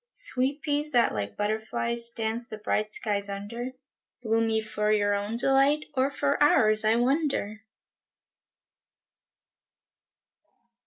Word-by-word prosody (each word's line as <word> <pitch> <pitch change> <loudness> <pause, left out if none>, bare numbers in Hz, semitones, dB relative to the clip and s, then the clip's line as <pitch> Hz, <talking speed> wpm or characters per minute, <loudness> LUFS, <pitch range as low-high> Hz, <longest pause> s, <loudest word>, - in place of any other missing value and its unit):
Sweet 275 - -1
peas 295 0 -1
that, 240 -1 +4
like 100 -1 -4
butterflies, 220 +2 -2
Dance 230 +1 -3
the 215 - -7
bright 215 0 -1
skies 205 -2 -2
under, 230 +6 -5 0.5
Bloom 225 0 +1
ye 220 0 +2
for 215 -1 -1
your 205 -1 +2
own 205 +2 -2
delight, 275 +4 +3
Or 265 0 +2
for 285 0 -1
ours, 215 -7 +4
I 215 +1 +3
wonder! 245 -4 0
230 Hz, 115 wpm, -27 LUFS, 215-270 Hz, 0.5 s, that